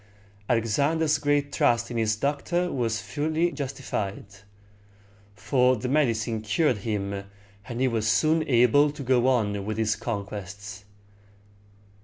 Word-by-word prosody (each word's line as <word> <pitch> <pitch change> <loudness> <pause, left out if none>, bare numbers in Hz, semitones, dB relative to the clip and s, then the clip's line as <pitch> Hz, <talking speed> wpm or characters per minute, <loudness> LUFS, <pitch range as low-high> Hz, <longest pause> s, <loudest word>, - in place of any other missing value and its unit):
Alexander's 140 +7 +1
great 145 -1 0
trust 120 0 +2
in 120 - -3
his 110 -1 +1
doctor 150 +8 -1
was 115 -4 -1
fully 160 +3 -1
justified; 130 - -4 1.1
for 125 +6 +2
the 125 +2 -4
medicine 115 -6 +1
cured 120 +4 +1
him, 100 -1 -3 0.4
and 120 0 -5
he 130 - +3
was 115 -3 -1
soon 155 +9 +3
able 125 +3 +4
to 145 -1 -7
go 130 -1 +2
on 105 -6 +1
with 110 +1 -4
his 110 -2 +1
conquests. 100 -2 -6
120 Hz, 125 wpm, -26 LUFS, 110-145 Hz, 1.1 s, able